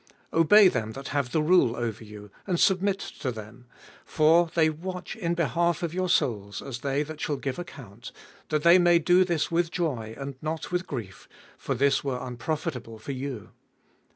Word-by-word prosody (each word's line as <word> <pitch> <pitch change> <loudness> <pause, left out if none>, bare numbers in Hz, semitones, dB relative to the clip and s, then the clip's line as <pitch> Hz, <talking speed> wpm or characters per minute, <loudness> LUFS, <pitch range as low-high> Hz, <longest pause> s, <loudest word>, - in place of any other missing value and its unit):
17. - - 0
Obey 205 +5 +7
them 115 -10 -1
that 135 +2 -7
have 140 -3 -1
the 155 - +1
rule 155 -8 +4
over 115 -2 -4
you, 105 -1 -12 0.2
and 180 -3 0
submit 195 +1 +3
to 135 -8 -5
them: 115 +2 -11 0.4
for 165 +2 +3
they 160 -2 +4
watch 180 +5 -5
in 170 -6 -2
behalf 170 +1 0
of 170 -1 -2
your 185 0 -1
souls, 100 - 0
as 130 -3 -6
they 140 +2 -1
that 155 0 -9
shall 150 - -1
give 135 +3 -4
account; 125 - -10 0.4
that 155 -1 0
they 170 +2 +7
may 175 -1 +5
do 180 +3 +4
this 170 -4 -1
with 170 0 +1
joy, 130 -11 -3
and 140 0 -5
not 155 +3 -4
with 180 0 -1
grief: 110 -10 -7 0.3
for 135 - -3
this 135 +2 +2
were 135 -3 -2
unprofitable 125 -1 -4
for 110 +6 -7
you. 130 -4 -6
150 Hz, 185 wpm, -26 LUFS, 125-170 Hz, 0.4 s, Obey